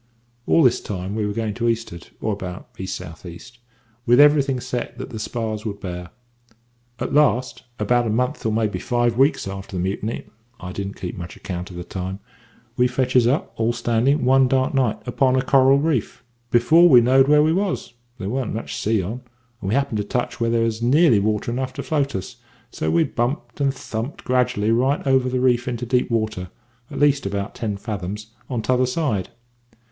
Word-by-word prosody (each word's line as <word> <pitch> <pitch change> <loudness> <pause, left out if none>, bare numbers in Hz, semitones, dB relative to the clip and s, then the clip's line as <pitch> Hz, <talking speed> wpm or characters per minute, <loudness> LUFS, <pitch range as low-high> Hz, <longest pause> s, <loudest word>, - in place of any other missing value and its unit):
"All 165 - +5
this 125 -2 +3
time 95 -1 -5
we 105 -1 -1
were - - -2
going 110 -1 -2
to 120 +2 -3
the - - +4
east'ard, 115 -7 -4
or 110 - -1
about 95 -2 -7
east 95 0 -4
south 85 -2 -9
east, 95 +8 -11 0.5
with 120 +2 +5
everything 145 -3 +5
set 120 0 -4
that 130 - -7
the 110 - -6
spars 110 -1 -3
would 100 -2 -5
bear. 90 -2 -6 0.9
At - - -4
last, 130 -4 +2
about 120 -1 +1
a - - -1
month 125 +4 -1
or 110 - 0
maybe 110 -1 0
five 120 -2 0
weeks 135 -3 +2
after 95 0 -7
the - - -1
mutiny 100 +4 -3 0.3
I 90 0 -7
didn't 100 +1 -5
keep 90 -1 -6
much 85 +1 -7
account 90 -1 -6
of 90 - -10
the 90 - -5
time 95 +1 -5 0.6
we 125 - +4
fetches 125 -1 +2
up, 135 +5 0
all 115 +1 +1
standing, 120 +4 +1
one 130 0 +5
dark 130 +4 +1
night, 130 -5 +1
upon 130 +1 +2
a 130 - +2
coral 135 0 +5
reef, 140 -5 -1 0.3
before 160 +9 +5
we 125 -5 +9
knowed 130 +3 +4
where 150 0 +5
we 160 +1 +3
was. 190 -8 -2 0.2
There 95 - -5
warn't 125 0 -2
much 115 - -5
sea 110 -2 +1
on, 115 +8 -5 0.4
and 95 - -3
we 105 - +1
happened 140 -5 0
to - - 0
touch 120 +4 -3
where 115 - +2
there 115 0 +2
was 115 0 -1
nearly 130 -1 +4
water 105 +3 -1
enough 130 +1 -3
to - - -5
float 140 -4 -1
us; 95 - -5 0.3
so 80 - -2
we 80 +1 +3
bumped 125 +4 -3
and 140 -1 +3
thumped 120 0 -6
gradually 125 -4 +1
right 130 +6 +1
over 130 -1 +3
the 130 0 -1
reef 125 -1 +2
into 125 -1 -3
deep 125 +1 +1
water 110 -6 -2 0.4
at - - -7
least 140 -6 +3
about 100 +1 -3
ten 105 -3 -3
fathoms 105 +1 -5 0.2
on 120 -4 -2
t'other 130 +1 +2
side. 125 - -1
120 Hz, 200 wpm, -22 LUFS, 105-130 Hz, 0.9 s, we